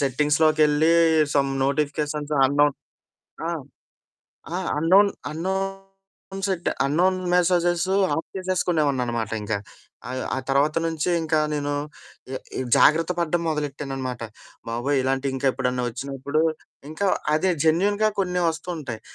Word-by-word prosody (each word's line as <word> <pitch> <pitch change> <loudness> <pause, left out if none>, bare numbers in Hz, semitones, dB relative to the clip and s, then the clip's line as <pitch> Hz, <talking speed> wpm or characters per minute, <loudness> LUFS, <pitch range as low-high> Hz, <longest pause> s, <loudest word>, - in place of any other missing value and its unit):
సెట్టింగ్స్‌లోకెళ్ళీ, 150 +3 +3 0.4
some 135 -1 +2
notifications 150 +1 -1
unknown 145 +1 +3 0.7
ఆ! - - 0 1.1
ఆ! - - 0 0.2
Unknown 190 +6 +5 0.2
unknown 195 +2 -6
సెడ్డ, 185 -2 -2 0.2
unknown 180 +6 +2 0.2
messages 175 0 +2 0.3
of 160 - -3
చేసేసుకునేవోడిననమాట 145 -11 0
ఇంక. 105 +1 -3 0.5
ఆ - - -6
యొ 130 - -3
ఆ - - -3
తర్వాత 140 +3 +2
నుంచీ 160 -1 -2
ఇంకా 160 -1 +1 0.2
నేను 145 -1 -2 0.6
ఎ - - -2 0.2
ఇవ్ 130 - -3
జాగ్రత్త 165 +3 +4
పడడం 170 0 0
మొదలెట్టాననమాట. 135 -4 -3 0.5
బాబోయ్! 120 +5 0
ఇలాంటియికెప్పుడన్నా 130 -1 0
ఒచ్చినప్పుడు, 135 +4 -2 0.5
ఇంకా 175 +6 -1 0.3
అదే 185 +4 +2
జెన్యూన్‌గా 205 +7 +3
కొన్ని 180 -2 0
వస్తుంటయి. 160 -8 -5
155 Hz, 105 wpm, -24 LUFS, 135-175 Hz, 1.1 s, unknown